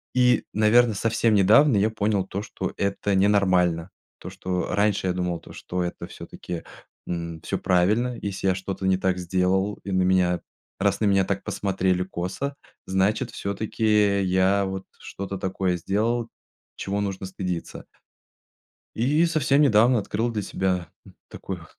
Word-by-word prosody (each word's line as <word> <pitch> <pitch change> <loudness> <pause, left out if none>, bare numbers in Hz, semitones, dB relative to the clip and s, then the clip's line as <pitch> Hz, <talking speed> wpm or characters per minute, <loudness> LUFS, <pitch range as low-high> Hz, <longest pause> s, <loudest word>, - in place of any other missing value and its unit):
И, 125 -2 +3
наверно, 110 +2 +4
совсем 115 +1 +1
недавно 110 +6 +5
я 105 +2 +3
понял 105 -3 0
то, 95 +1 -4
что 105 - -5
это 100 0 -1
ненормально. 95 -3 +2 0.3
То, - - -8
что 90 -1 -3
раньше 100 -2 +1
я 90 - +1
думал 90 -1 -2
то, - - -14
что 90 0 -4
это 85 - -5
всё-таки, 85 -2 -8 0.4
м, 85 -2 -4
всё - - -2
правильно, 110 +8 +2
если 95 -1 -3
я 95 - +3
что-то 95 0 -4
не 95 -1 +3
так 95 -1 0
сделал 95 +3 0
и 100 - -5
на 95 0 +2
меня, 90 -1 +2 0.4
раз 100 0 +1
на 110 - +1
меня 95 -2 +3
так 100 0 -2
посмотрели 95 -2 0
косо, 95 +10 -4 0.3
значит 100 +6 +1
всё-таки 105 0 +1
я 95 +2 +2
вот 95 0 -5
что-то 100 0 -6
такое 95 -1 -1
сделал, 115 +6 -1 0.5
чего 100 +1 -3
нужно 95 -1 -3
стыдиться. 90 -2 -5 1.1
И 145 +8 +2
совсем 150 -3 +2
недавно 120 -2 +5
открыл 110 +3 -2
для 110 -2 -2
себя, 95 -2 -1 0.2
м, - - -16
такую 90 -3 -7
100 Hz, 150 wpm, -24 LUFS, 95-110 Hz, 1.1 s, недавно